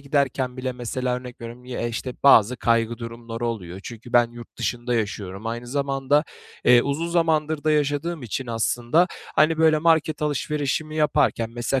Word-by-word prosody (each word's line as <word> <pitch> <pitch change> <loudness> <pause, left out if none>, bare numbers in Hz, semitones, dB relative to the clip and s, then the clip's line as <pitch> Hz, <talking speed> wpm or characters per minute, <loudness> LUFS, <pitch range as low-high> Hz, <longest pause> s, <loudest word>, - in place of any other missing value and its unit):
giderken 140 -2 0
bile 130 0 -3
mesela 125 +1 -2
örnek 125 -1 -9
veriyorum: 120 +1 -9
Ye 125 -2 -3
işte, 125 +2 -5
bazı 125 -3 +6
kaygı 115 0 +1
durumları 115 0 -6
oluyor. 95 -5 -5
Çünkü 120 +2 -10
ben 120 -1 +4
yurt 120 -1 -12
dışında 120 0 -2
yaşıyorum. 100 -2 -3
Aynı 120 +1 -4
zamanda, 140 +2 +1 0.4
eee, 120 -1 +7
uzun 145 +4 -2
zamandır 160 -3 +1
da 155 - +3
yaşadığım 150 +2 0
için 125 +2 -4
aslında, 120 +8 +1 0.3
hani, 155 +1 +4
böyle, 160 -1 +5
market 160 -1 +2
alışverişimi 150 +1 -1
yaparken, 120 -6 +2
mesela 120 +3 -1
125 Hz, 160 wpm, -24 LUFS, 120-150 Hz, 0.4 s, eee